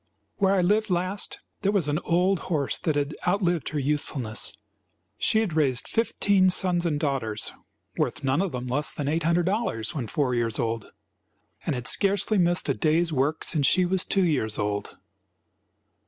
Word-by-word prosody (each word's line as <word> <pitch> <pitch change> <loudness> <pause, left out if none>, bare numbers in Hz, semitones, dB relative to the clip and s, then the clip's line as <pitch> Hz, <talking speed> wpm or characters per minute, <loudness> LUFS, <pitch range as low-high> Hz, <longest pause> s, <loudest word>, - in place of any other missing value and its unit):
"Where 195 0 +3
I 185 - +3
lived 210 +4 +2
last 185 +3 -1 0.2
there 200 - +2
was 195 -7 +1
an 150 +2 0
old 180 +2 +1
horse 145 -6 0
that 155 - -1
had 145 +1 -1
outlived 180 -4 +1
her 155 - -4
usefulness. 135 -5 -2 0.6
She 220 - +3
had 205 -7 -2
raised 140 -6 +1
fifteen 200 -4 +2
sons 180 -2 +2
and 150 -3 -1
daughters, 130 -8 -1 0.5
worth - - -1
none 135 +5 +2
of 195 -3 -1
them 125 0 -4
less 135 +4 0
than 145 - -4
$800 170 - 0
when 130 -7 -3
four 130 +2 0
years 115 -2 0
old, 115 -1 -2 0.8
and - - +1
had 125 -1 -5
scarcely 200 +1 +2
missed 175 0 +1
a - - +2
day's 165 +1 +1
work 145 +4 0
since 145 -4 +2
she 185 +4 +3
was 185 +1 +2
two 195 - +1
years 125 -11 0
old. 105 0 -3
160 Hz, 170 wpm, -26 LUFS, 135-185 Hz, 0.8 s, Where